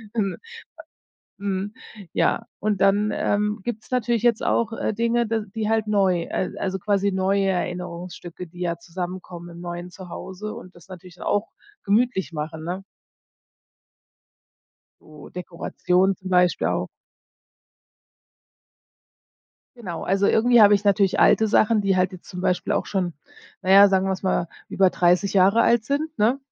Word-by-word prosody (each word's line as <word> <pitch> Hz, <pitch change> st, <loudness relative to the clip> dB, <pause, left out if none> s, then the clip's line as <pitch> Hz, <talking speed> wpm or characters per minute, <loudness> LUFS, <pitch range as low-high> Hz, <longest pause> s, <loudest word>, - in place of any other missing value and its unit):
Ähm. 200 Hz, -4 st, -1 dB, 1.0 s
Mhm. 200 Hz, +1 st, -3 dB, 0.4 s
Ja, -, -, +1 dB
und 210 Hz, -2 st, -1 dB
dann, 205 Hz, +2 st, +3 dB
ähm, 210 Hz, +1 st, 0 dB
gibt's 225 Hz, -1 st, -6 dB
natürlich 240 Hz, -2 st, 0 dB
jetzt 235 Hz, -2 st, +3 dB
auch, 230 Hz, -1 st, +1 dB
äh, 225 Hz, -, -2 dB
Dinge, 235 Hz, +2 st, +1 dB
d 225 Hz, 0 st, 0 dB
die 220 Hz, -1 st, -2 dB
halt 220 Hz, -1 st, +1 dB
neu 195 Hz, -4 st, +2 dB
äh, 185 Hz, -, -3 dB
also 190 Hz, 0 st, -2 dB
quasi 200 Hz, 0 st, +1 dB
neue 195 Hz, +1 st, +1 dB
Erinnerungsstücke, 180 Hz, -1 st, -5 dB
die 175 Hz, +2 st, -12 dB
ja 170 Hz, -1 st, -1 dB
zusammenkommen 175 Hz, 0 st, -7 dB
im 170 Hz, -, -11 dB
neuen 175 Hz, 0 st, -6 dB
Zuhause 190 Hz, +3 st, -8 dB
und 185 Hz, -, -11 dB
das 175 Hz, 0 st, -17 dB
natürlich 180 Hz, -1 st, -12 dB
auch 205 Hz, +2 st, -1 dB, 0.3 s
gemütlich 205 Hz, -3 st, +1 dB
machen, 155 Hz, +1 st, -5 dB
ne? 180 Hz, +3 st, -4 dB, 2.2 s
So, 150 Hz, -2 st, -14 dB
Dekoration 180 Hz, +1 st, 0 dB
zum 185 Hz, -, -9 dB
Beispiel 180 Hz, -1 st, +3 dB
auch. -, -, -1 dB, 2.9 s
Genau, 185 Hz, -8 st, -6 dB
also 195 Hz, +2 st, +1 dB
irgendwie 240 Hz, +2 st, +4 dB
habe 205 Hz, -1 st, +8 dB
ich 200 Hz, +1 st, 0 dB
natürlich 200 Hz, -1 st, +3 dB
alte 220 Hz, -, +5 dB
Sachen, 215 Hz, +1 st, +3 dB
die 195 Hz, -2 st, +1 dB
halt 185 Hz, +1 st, +1 dB
jetzt 185 Hz, -, -12 dB
zum 180 Hz, -, -7 dB
Beispiel 180 Hz, -1 st, 0 dB
auch -, -, 0 dB
schon 180 Hz, -4 st, -2 dB, 0.5 s
naja, 195 Hz, +2 st, +7 dB
sagen 190 Hz, -1 st, +2 dB
wir 190 Hz, -, +1 dB
es 190 Hz, -, -5 dB
mal, 185 Hz, -2 st, 0 dB, 0.2 s
über 190 Hz, -2 st, +3 dB
30 180 Hz, +3 st, +2 dB
Jahre 200 Hz, +4 st, +4 dB
alt 235 Hz, -2 st, +3 dB
sind, 305 Hz, +3 st, -2 dB
ne? 225 Hz, +6 st, +3 dB
195 Hz, 145 wpm, -23 LUFS, 180-210 Hz, 2.9 s, habe